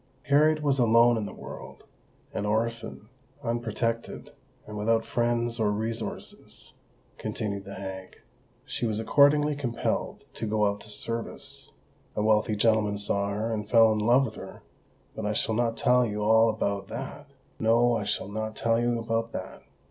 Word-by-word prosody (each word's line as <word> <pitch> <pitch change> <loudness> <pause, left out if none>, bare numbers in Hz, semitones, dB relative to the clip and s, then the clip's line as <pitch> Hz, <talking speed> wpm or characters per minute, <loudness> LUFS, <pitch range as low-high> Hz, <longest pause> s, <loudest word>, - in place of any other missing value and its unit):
"Harriet 150 +1 +3
was 140 -2 +2
alone 120 0 +5
in 110 -2 -2
the - - -6
world—an - - -10
orphan—unprotected—and 115 0 -4
without 115 +2 +1
friends 120 0 0
or 110 -2 +2
resources," 110 +2 -5 0.5
continued 100 -2 -4
the 100 - -8
hag. 95 -1 -8 0.5
"She 120 - -2
was 110 -1 -1
accordingly 145 +5 +4
compelled 125 -5 -2
to 115 - -4
go 105 0 +2
out 100 0 -1
to 105 - -12
service. 115 +2 -5 0.5
A 105 - 0
wealthy 110 0 +3
gentleman 105 -1 +2
saw 100 0 -1
her, 110 +3 -2
and 105 -1 -4
fell 115 -1 +6
in 110 - 0
love 120 +5 +4
with 110 - -6
her—but 110 - -12
I 105 +1 0
shall 110 - 0
not 115 0 0
tell 125 0 +4
you 105 -2 -2
all 110 +1 +5
about 100 -2 -2
that! 145 +5 -7 0.3
No—I 115 0 +3
shall 100 - -2
not 110 +1 -4
tell 115 +1 +1
you 120 0 +1
about 115 0 -2
that! - - -6
115 Hz, 150 wpm, -27 LUFS, 105-120 Hz, 0.5 s, fell